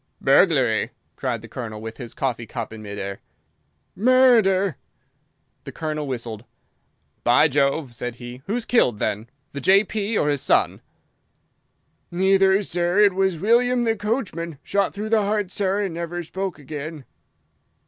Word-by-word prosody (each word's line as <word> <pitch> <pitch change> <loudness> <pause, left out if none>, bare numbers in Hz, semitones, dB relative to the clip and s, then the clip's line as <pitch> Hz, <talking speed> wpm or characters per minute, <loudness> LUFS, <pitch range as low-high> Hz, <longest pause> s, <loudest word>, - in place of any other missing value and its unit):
"Burglary!" - - +3 0.3
cried 120 -4 -3
the - - -9
Colonel, 115 -2 -6
with 110 +1 -8
his 120 -4 -9
coffee 120 -4 -2
cup 115 -1 -5
in 110 - -9
mid 100 -1 -7
air. 100 0 -5 0.8
"Murder!" 220 - +4 0.9
The - - -8
Colonel 155 -2 -4
whistled. 115 -4 -5 0.8
"By 120 +6 +5
Jove!" 140 -1 0
said 120 0 -5
he. 120 +1 -9
"Who's 225 +3 -2
killed, 125 - +3
then? 105 +3 -2 0.2
The 140 - -6
J.P. 205 - +2
or 150 - +2
his 145 -2 0
son?" - - +2 1.3
"Neither, 190 +2 +3
sir. 175 0 -1
It 205 -2 +6
was 190 -2 +1
William 240 +6 +3
the 225 -1 +1
coachman. 200 - -3
Shot 200 -1 0
through 210 +2 -5
the 225 -1 +3
heart, 205 -2 -1
sir, 200 +1 0
and 190 -4 -3
never 170 +1 -4
spoke 190 +3 -4
again." 150 0 -7
170 Hz, 145 wpm, -23 LUFS, 125-200 Hz, 1.3 s, It